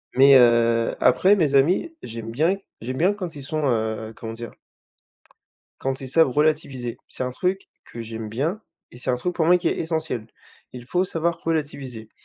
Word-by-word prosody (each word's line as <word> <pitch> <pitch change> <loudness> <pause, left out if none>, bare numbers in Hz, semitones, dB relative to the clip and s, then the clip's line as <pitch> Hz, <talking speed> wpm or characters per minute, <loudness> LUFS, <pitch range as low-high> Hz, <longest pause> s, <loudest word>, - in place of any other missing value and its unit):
Mais, 135 +1 +7
heu, 115 -1 +4
après, 185 +11 +5
mes 155 -8 +1
amis, 180 - +2
j'aime 115 0 -7
bien, 155 +11 +1 0.3
j'aime 130 +3 -4
bien 185 +7 +3
quand 185 -6 -6
ils 140 - -8
sont, 155 +2 -2
heu, 110 -2 -1
comment 115 -1 -7
dire? 115 0 -8 1.3
Quand 135 0 -2
ils 130 - -5
savent 160 +2 +4
relativiser. 140 -4 0
C'est - - -5
un 125 - -3
truc 185 +9 -2 0.2
que 115 - -8
j'aime 115 -1 -6
bien 155 - -2 0.3
et - - -12
c'est 125 - -1
un - - +1
truc 175 +9 -3
pour 160 - +1
moi 180 +2 +6
qui 175 - 0
est - - -2
essentiel. 160 -8 -2 0.5
Il 125 -1 -9
faut 180 +8 0
savoir 170 -1 -1
relativiser. 140 -8 -3
135 Hz, 185 wpm, -23 LUFS, 120-165 Hz, 1.3 s, Mais